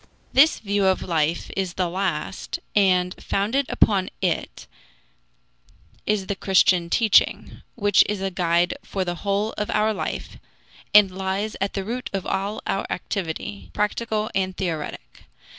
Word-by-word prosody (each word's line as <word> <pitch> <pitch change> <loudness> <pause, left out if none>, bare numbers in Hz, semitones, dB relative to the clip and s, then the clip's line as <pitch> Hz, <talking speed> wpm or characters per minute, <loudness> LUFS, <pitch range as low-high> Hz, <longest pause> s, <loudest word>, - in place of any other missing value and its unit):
This 300 +5 +6
view 200 -2 0
of 190 - +2
life 165 -1 -1
is 190 -3 -2
the 185 -2 0
last, 185 -1 -3 0.2
and 180 -3 +3
founded 230 +8 0
upon 195 -3 +2
it 180 -4 -2 1.4
is 210 -2 +1
the 200 - -2
Christian 185 -2 +3
teaching, 220 +2 +2
which 205 -3 +4
is 210 -1 -1
a 195 0 -2
guide 175 -1 +1
for 190 -2 -3
the 175 - -2
whole 205 +2 0
of 210 - -2
our 215 +1 +2
life 200 - -5 0.5
and 205 -2 +7
lies 190 +3 -2
at 195 - -1
the 195 - -2
root 250 +4 -4
of 195 -2 -2
all 200 +2 -2
our 195 - -1
activity, 130 - -4
practical 215 +1 -1
and 185 -1 -1
theoretic. 155 - -5
195 Hz, 140 wpm, -23 LUFS, 180-210 Hz, 1.4 s, and